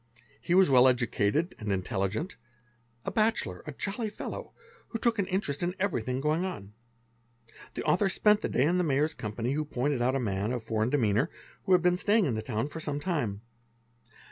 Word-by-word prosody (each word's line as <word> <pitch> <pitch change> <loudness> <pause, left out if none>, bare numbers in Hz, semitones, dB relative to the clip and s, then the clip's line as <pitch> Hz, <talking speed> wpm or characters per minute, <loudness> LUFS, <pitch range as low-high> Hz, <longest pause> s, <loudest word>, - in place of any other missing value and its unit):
He 175 - +1
was. 190 0 +6
well 130 -1 +6
educated 125 - +1
and 105 -2 -3
intelligent, 100 - -2 0.7
a - - -2
bachelor, 215 - 0
a - - -3
jolly 210 - -3
fellow, - - -7 0.3
who 230 - -4
took 230 -1 +1
an 195 - +1
interest 180 -7 -1
in 175 +1 -1
everything 130 - -1
going 155 +5 +1
on. 105 - -6 1.0
The - - -3
author 195 +2 +2
spent 210 +2 +3
the - - -2
day - - +2
in 175 +4 +2
the - - +2
Mayor's 150 0 +1
Wespany, 115 +4 -3
who 155 +2 0
pointed 140 -2 -1
out 130 +2 +2
a - - +1
man, 105 -1 -1
of 120 -2 -3
foreign 110 +1 0
demeanour, 120 0 +2 0.4
who 190 - +3
had 180 -2 +5
been 180 0 +3
Staying 210 +2 +3
in 135 - 0
the 110 - -2
town 110 +2 -2
for 150 +2 -7
some 145 -2 -3
time. 145 - -2
145 Hz, 195 wpm, -29 LUFS, 115-180 Hz, 1.0 s, was